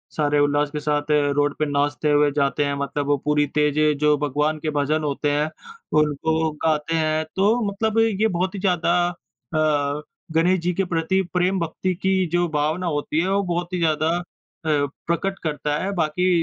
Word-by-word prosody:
सारे 145 -1 +2
उल्लास 145 0 +2
के 150 - -3
साथ 145 0 -1
अ, 145 -1 +3
रोड 145 0 +1
पे 155 - +2
नाचते 145 +1 0
हुए 145 0 +4
जाते 140 0 +1
हैं। 140 - -1
मतलब 140 +1 -2
वो 145 0 +3
पूरी 150 0 +3
तेज़ 150 0 +2 0.2
जो 150 0 +3
भगवान 150 +2 0
के 155 - -2
भजन 150 +1 0
होते 145 0 -1
हैं, 150 +2 0 0.5
उनको 160 +2 +1
गाते 155 +1 +1
हैं। 155 0 +1
तो 210 +5 +3
मतलब 220 +2 0
ये 220 -1 +2
बहुत 185 +2 -1
ही 195 - -4
ज़्यादा 180 -3 +1 0.6
अ, 150 -2 +1 0.3
गणेश 180 +3 +3
जी 175 +1 -1
के 195 - 0
प्रति 175 +2 0
प्रेम 185 +1 +1
भक्ति 170 +3 -2
की 190 +1 0 0.2
जो 175 0 +2
भावना 155 +5 0
होती 145 +1 -1
है 185 - -1
वो 200 0 +2
बहुत 175 +1 -2
ही - - 0
ज़्यादा 155 -1 +1
अ, - - -3 0.9
प्रकट 195 +4 -1
करता 150 -2 -1
है। 195 - -1
बाकी 175 +3 +1
155 Hz, 185 wpm, -22 LUFS, 145-175 Hz, 0.9 s, हुए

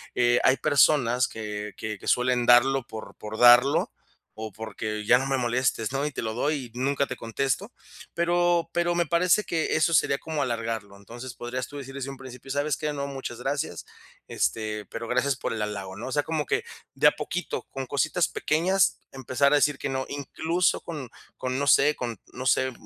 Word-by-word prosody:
eh, 120 0 +3
hay 130 +1 +5
personas 125 -4 +3
que 105 -1 -6
que 105 -2 -5
que - - -10
suelen 125 -1 +2
darlo 130 +2 +6
por 110 -1 -8
por 110 +1 -7
darlo 120 +3 +6 0.5
o 110 -3 -6
porque 110 -1 -5
ya 125 +3 +6
no 130 - -2
me 135 - +1
molestes, 120 -2 0
¿no? 140 +2 -1
Y 150 - -2
te - - -4
lo 110 -1 -3
doy 135 -1 -2
y 125 - -7
nunca 140 +1 +1
te 130 - -5
contesto, 135 - -2 0.4
pero 175 0 +2
pero 175 0 +1
me 175 -1 +2
parece 175 +6 +3
que 160 -2 -1
eso 160 +1 +2
sería 140 -2 +3
como 155 -1 -3
alargarlo. 115 -5 -3
Entonces 120 +5 -9
podrías 125 +1 -5
tú 145 - -9
decir 135 -1 -8
desde 140 0 -5
un 135 - -7
principio: 130 0 -11
"¿Sabes 145 +2 0
qué? 150 -1 -2
No, 140 -1 -3
muchas 135 -4 -6
gracias, 140 - -3 0.4
este, 105 -2 -2
pero 115 +3 -7
gracias 130 +2 +1
por - - -4
el 115 -2 -3
halago", 100 -2 -4
¿no? 115 - -6
O - - -5
sea, 145 - +2
como 155 -3 -2
que - - 0 0.3
de - - +5
a - - +7
poquito, - - -4
con 135 -1 -4
cositas 155 +6 +1
pequeñas, 185 +5 +1
empezar 135 +1 +1
a 150 - +5
decir 145 0 +2
que - - -4
no, 130 0 -2
incluso 160 +5 0
con 145 -7 -7 0.3
con 130 +1 -2
no 145 - -1
sé 150 +2 +5
con 120 -4 -4
no 130 +1 -7
sé, 130 +2 +2
130 Hz, 200 wpm, -26 LUFS, 120-145 Hz, 0.5 s, a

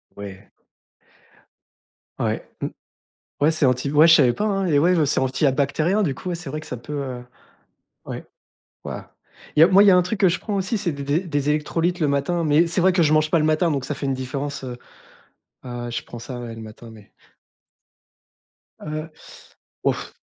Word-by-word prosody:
Ouais. 100 -1 -10 1.7
Ouais, - - -2
mmh. - - -1 0.7
Ouais 150 +2 +5
c'est 155 -2 +1
anti 130 +2 +1
ouais 150 +2 +6
je 165 - +8
savais 130 -6 +5
pas, 210 - -2
hein, 195 -2 0
les 150 -5 +3
ouais, 175 +5 +4
heu, 155 - +3
c'est 140 - +2
anti 130 +3 0
à 135 - +5
bactérien 155 +9 +1
du 140 -8 -1
coup, 180 - -6
ouais 175 - -1
c'est 170 -4 -8
vrai 155 +2 -4
que - - -12
ça 125 - -5
peut 120 +6 -8
heu, 130 -4 -4 0.8
ouais. - - -6 0.6
Waouh. - - -5 0.5
Il - - +5
y - - +9
a - - +7
moi 190 +2 +6
il - - +5
y - - +8
a 185 - +6
un - - +6
truc 185 +4 -3
que 195 - +6
je 180 - -1
prends 210 - -4
aussi 195 +3 -1
c'est 180 -4 -1
des 140 -1 -6
des 145 +4 +1
des 145 -6 -2
électrolytes 165 +4 0
le 150 - +2
matin, 140 +5 0
mais 155 +2 +4
c'est 175 +2 -1
vrai 185 +2 +4
que 175 - +3
je 155 -1 +3
mange 155 0 +3
pas 170 - +3
le 155 - +1
matin 155 +2 +2
donc 140 -4 -1
ça 150 - -3
fait 140 - -4
une 135 - 0
différence, 135 +2 -4
heu 125 -1 -6 0.9
heu, 120 -1 -5
je 120 - -3
prends 120 - -9
ça 125 +1 -7
ouais, 120 -1 -7
le 115 - -9
matin 110 +1 -11
mais 105 -2 -16 1.7
Heu. 155 +1 -5 0.7
Ouf. - - -1
150 Hz, 220 wpm, -22 LUFS, 130-170 Hz, 1.7 s, y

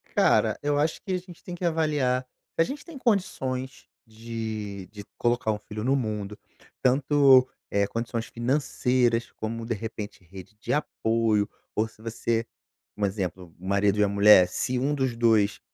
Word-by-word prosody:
Cara, - - +3
eu 145 0 +1
acho 155 +2 0
que 190 - -3
a - - +2
gente 180 -1 -12
tem 180 - -6
que 175 - -4
avaliar: 150 -6 +1 0.3
"A 165 - +5
gente 280 - -5
tem 335 -4 -10
condições 135 - -1 0.2
de 110 -3 -6
de 105 -1 -9
colocar 120 -2 +1
um 105 - -3
filho 105 0 -7
no 135 +3 +2
mundo, 105 -5 -3 0.4
tanto, 135 0 +5 0.2
eh, 100 0 +1
condições 115 +1 -3
financeiras, 125 -2 +1
como 115 +1 -4
de 115 - -1
repente 105 -2 -6
rede 95 +3 -12
de - - -2
apoio 110 -7 +1 0.3
ou 110 +1 +1
se 110 - -20
você, 115 0 -1 0.5
um 105 - +1
exemplo, 95 -3 -4
o 95 - -11
marido 100 +1 +2
e - - +5
a - - +3
mulher, 100 -2 +7
se 125 +7 -2
1 140 +4 +1
dos 130 -4 -1
2 110 -3 +3
115 Hz, 170 wpm, -26 LUFS, 105-135 Hz, 0.5 s, mulher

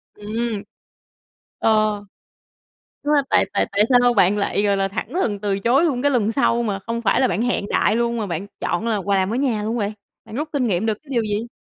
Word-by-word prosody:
Ừm. 215 0 -3 1.0
Ờ, - - +2 1.3
đúng 295 +1 +1
rồi, 285 - +4
tại - - +4
tại - - +1
tại 200 +1 +3
sao 245 -1 +5
bạn 195 -1 +4
lại, 200 0 0
gọi 200 -1 +2
là, 195 0 0
thẳng 195 - -4
thừng 235 - 0
từ 200 -1 -1
chối 240 - +3
luôn 265 -7 0
cái 285 - +3
lần 225 -5 +1
sau 240 -2 +2
mà 205 -4 -2
không 230 +4 -4
phải 215 - +2
là 260 - +3
bạn 195 +3 -1
hẹn 245 -4 0
đại 215 - +2
luôn, 235 0 0
mà 215 - -2
bạn 175 +1 -4
chọn 195 +6 -1
là 225 -2 +1
quà 195 -1 +1
ở 210 +5 -2
nhà 250 -6 0
luôn 220 +3 -2
vậy? 210 -2 -1 0.3
Bạn 220 - -11
rút 300 +5 -3
kinh 275 -4 0
nghiệm 200 0 0
được 220 - +1
cái 305 - -24
điều 240 -4 +1
gì? 210 +1 -2
220 Hz, 235 wpm, -21 LUFS, 200-245 Hz, 1.3 s, sao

